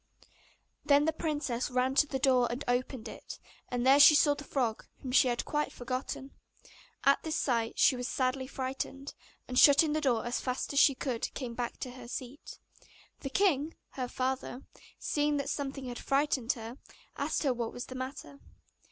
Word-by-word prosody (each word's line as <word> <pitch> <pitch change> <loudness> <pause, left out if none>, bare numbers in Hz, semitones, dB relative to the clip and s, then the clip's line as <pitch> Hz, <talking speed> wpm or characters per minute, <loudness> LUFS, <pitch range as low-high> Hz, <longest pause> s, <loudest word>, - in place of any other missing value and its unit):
Then 290 0 +4
the 320 - +1
princess 290 -6 -2
ran 255 +1 +1
to 295 +2 +4
the 275 - -2
door 255 -3 +3
and 245 +4 -4
opened 245 -1 -1
it, - - -9 0.3
and 245 0 -2
there 270 +2 +6
she 295 +1 +9
saw 295 -1 +5
the 285 0 -8
frog, 245 -7 -2 0.2
whom 260 - -4
she 255 - +5
had 240 -1 -1
quite 300 0 -1
forgotten. 255 +2 -5 0.7
At 275 0 +4
this 320 0 -3
sight 230 -7 0
she 260 - +5
was 250 0 -4
sadly 260 0 -1
frightened, 270 +1 -5 0.3
and 250 0 +1
shutting 295 +1 +6
the 310 - 0
door 240 -6 +1
as 240 - -1
fast 255 +2 -3
as 280 - +3
she 275 - +6
could 250 -3 -3
came 250 -4 -5
back 240 0 -4
to 255 - -4
her 250 -1 -11
seat. 255 +3 -8 0.6
The 275 - -5
king, 315 -2 +1 0.2
her 255 -2 -4
father, 260 0 -3 0.3
seeing 295 0 0
that 280 0 -2
something 275 -1 -4
had 245 -1 -6
frightened 275 -3 +1
her, 230 +1 -9 0.4
asked 295 +3 -1
her 270 -3 +2
what 235 -2 -3
was 245 - -6
the - - -9
matter. 265 +2 -7
265 Hz, 185 wpm, -31 LUFS, 250-285 Hz, 0.7 s, she